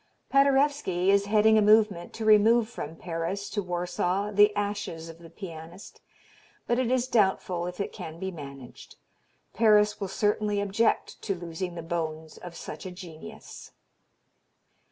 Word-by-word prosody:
Paderewski 275 -9 +3
is 200 0 +3
heading 215 +1 +5
a - - +3
movement 210 -4 +3
to 225 - -5
remove 220 +2 +5
from 160 -9 -7
Paris 175 +4 -4
to 205 - -1
Warsaw 180 +2 -2
the 205 +1 +5
ashes 200 -5 -3
of 165 0 -12
the 170 -1 -13
pianist, 170 0 -10 0.6
but 240 +1 +1
it 255 -2 0
is 255 -1 +1
doubtful 190 -6 +1
if 180 +1 -7
it 200 - -3
can 160 0 -8
be 190 +2 -4
managed. 140 -6 -11 0.6
Paris 210 -2 +4
will 195 - -1
certainly 210 +1 0
object 205 +3 0
to 195 - -2
losing 175 +1 -5
the 170 - -6
bones 160 -1 -4
of 175 -1 -10
such - - -8
a - - -7
genius. 180 +4 -11
195 Hz, 150 wpm, -27 LUFS, 170-215 Hz, 0.6 s, heading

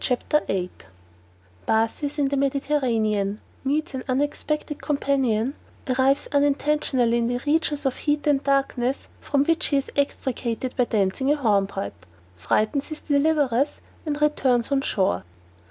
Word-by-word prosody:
CHAPTER 260 +4 +1
VIII 180 -2 -1 1.0
_Bathes 225 +7 0
in 280 -2 +2
the 280 - 0
Mediterranean 240 -8 0 0.2
Meets 300 +4 -1
an 260 - -4
unexpected 290 +2 -1
companion 270 -5 0 0.3
Arrives 265 +2 +2
unintentionally 285 -4 +2
in 230 - +1
the 245 0 -1
regions 295 -1 +1
of 265 - 0
heat 295 0 0
and 285 -2 +2
darkness, 275 -2 0
from 280 -1 +1
which 330 +1 +2
he 285 - +2
is 275 - -2
extricated 255 -3 -2
by 250 - +2
dancing 215 +5 +1
a - - +4
hornpipe 195 - -1 0.3
Frightens 215 - 0
his 310 -2 -7
deliverers, 285 -3 +1 0.2
and 295 -2 -3
returns 270 -5 +2
on 275 -1 +2
shore. 190 - 0
275 Hz, 135 wpm, -24 LUFS, 235-290 Hz, 1.0 s, a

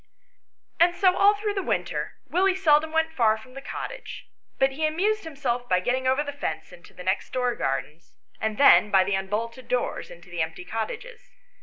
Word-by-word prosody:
And 345 +1 +5
so 370 -1 +4
all 405 +1 +5
through 415 0 -2
the 390 - -1
winter - - -2
Willie 375 +2 +2
seldom 315 -4 +3
went 320 0 +1
far 225 -6 +3
from 255 +4 -15
the 275 - -8
cottage; - - -7 0.3
but 270 0 +3
he 310 +3 0
amused 400 +6 0
himself 250 -5 -3
by 180 - +3
getting 255 +7 -1
over 265 +3 +2
the 285 -1 -6
fence 280 -9 -5
into 175 0 -16
the 180 - -9
next 185 +2 -1
door 250 -1 0
gardens, 150 - -4 0.2
and 220 -1 -2
then 280 -6 +7
by 190 -2 +5
the 200 +2 -2
unbolted 225 +6 -3
doors 250 -1 -2
into 175 +1 -14
the 175 -1 -2
empty 160 +3 -4
cottages. 435 - -5
260 Hz, 190 wpm, -25 LUFS, 200-320 Hz, 0.3 s, then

